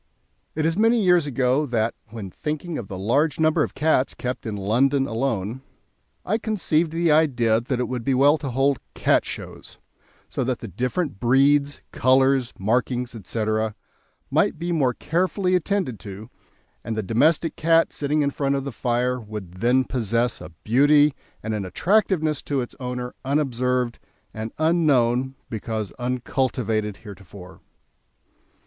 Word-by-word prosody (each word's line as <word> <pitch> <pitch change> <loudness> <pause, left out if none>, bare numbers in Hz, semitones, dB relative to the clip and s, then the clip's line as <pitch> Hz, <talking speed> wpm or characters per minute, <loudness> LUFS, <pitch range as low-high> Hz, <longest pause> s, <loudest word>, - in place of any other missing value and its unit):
It 155 0 0
is 165 +4 0
many 230 +2 +4
years 180 -6 +3
ago 135 +2 +1
that, 115 -2 0
when 105 -4 -8
thinking 155 - -4
of 110 - -7
the 95 - -6
large 135 +10 +1
number 155 0 +3
of - - -2
cats 150 -3 +1
kept 125 -1 -4
in 105 -2 -3
London 130 +8 +2
alone, 115 -1 -2 0.6
I 215 +4 0
conceived 175 -7 0
the 165 0 +1
idea 120 -8 +3
that 125 +1 -2
it 125 - 0
would 125 -2 -4
be 135 +2 +1
well 145 +4 +4
to 140 -2 -4
hold 135 +2 +1 0.2
"Cat - - +2
Shows," - - -9 0.5
so - - -2
that 125 -1 -1
the 115 - -8
different 125 - -2
breeds, 140 +4 +3
colours, 130 -1 +3
markings, 125 +4 0
etc., 110 0 -2 0.6
might - - +2
be 170 +2 -3
more 135 -7 +1
carefully 180 +3 0
attended 180 - 0
to, 105 +4 -9 0.5
and 110 -1 -4
the 110 - -1
domestic 150 - +2
cat, 165 +1 +3
sitting 150 +1 0
in 140 - 0
front 140 0 0
of 135 - -2
the 140 - -4
fire, 125 +1 0
would 105 -5 -9
then 125 +3 +3
possess 120 -1 -1
a - - -8
beauty 145 +5 +4 0.3
and 110 0 -2
an 105 -2 -2
attractiveness 160 - +1
to 140 -2 -2
its 120 - -6
owner 125 -1 -4
unobserved 125 -3 0 0.3
and 110 +1 -5
unknown 135 -6 +2
because 110 -1 -4
uncultivated 125 -4 -1
heretofore. 95 -2 -12
130 Hz, 150 wpm, -23 LUFS, 115-150 Hz, 0.6 s, many